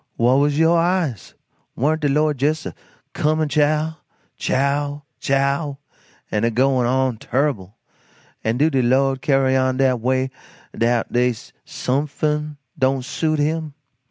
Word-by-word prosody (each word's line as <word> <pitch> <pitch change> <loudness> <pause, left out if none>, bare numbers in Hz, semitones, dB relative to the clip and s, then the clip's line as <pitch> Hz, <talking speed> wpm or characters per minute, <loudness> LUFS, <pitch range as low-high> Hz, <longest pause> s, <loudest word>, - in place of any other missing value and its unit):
Whah 120 +2 +3
was 145 +1 +2
yo' 165 +1 +4
eyes? 170 - 0 0.4
Warn't 155 +5 0
de 145 - +1
Lord 150 -1 +1
jes' 155 +2 +1
a - - -5 0.4
cumin' 155 0 0
chow! 155 +2 +1 0.4
chow! 145 +2 -1 0.2
CHOW! 140 +1 0 0.5
an' 105 0 0
a 115 - +3
goin' 125 +1 +2
on 130 -2 0
turrible 120 -9 -1 0.7
an' 110 +2 0
do 155 +4 +3
de 135 -2 +2
Lord 135 +2 +2
carry 135 -2 +2
on 130 0 +1
dat 130 -2 +2
way 130 +2 0 0.4
'dout 115 +1 0
dey's 120 -2 0
sumfin 150 +2 -2 0.2
don't 130 -1 +1
suit 155 +3 -1
him? 155 0 -1
135 Hz, 135 wpm, -21 LUFS, 130-150 Hz, 0.7 s, yo